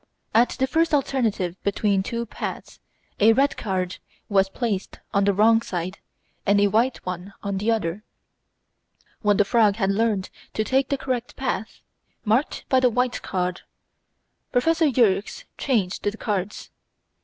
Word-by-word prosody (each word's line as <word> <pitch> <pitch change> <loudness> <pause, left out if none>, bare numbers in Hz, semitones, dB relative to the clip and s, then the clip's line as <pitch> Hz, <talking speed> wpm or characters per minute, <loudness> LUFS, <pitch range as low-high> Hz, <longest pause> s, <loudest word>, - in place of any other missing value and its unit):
At 235 +2 +5
the 265 - +2
first 325 +3 +2
alternative 220 -10 -1
between 200 -1 +1
two 235 +3 -3
paths, - - -6 0.4
a 220 +2 +6
red 275 +4 +2
card 185 -4 -2 0.3
was 195 -2 +3
placed 205 -3 -3 0.2
on 200 0 +3
the 200 - +4
wrong 225 +3 +4
side 180 -2 -4 0.4
and 200 0 +3
a 205 - +5
white 235 +5 +1
one 185 +2 -6
on 200 -1 -2
the 210 +3 0
other. 210 -3 -1 1.2
When 205 -1 +3
the 205 - +4
frog 215 -2 +3
had 195 -3 +1
learned 205 -2 0 0.2
to 215 - +1
take 265 +4 +1
the 280 - +1
correct 250 -3 -3
path, 240 -5 -3 0.4
marked 225 +7 +1
by 260 - +4
the 255 -1 +4
white 250 +1 0
card, 180 -1 -2 0.9
Prof. 325 +7 +2 0.2
Yerkes 215 - +2 0.2
changed 210 -9 0
the 205 +2 -2
cards. 205 -3 -3
215 Hz, 150 wpm, -24 LUFS, 195-245 Hz, 1.2 s, a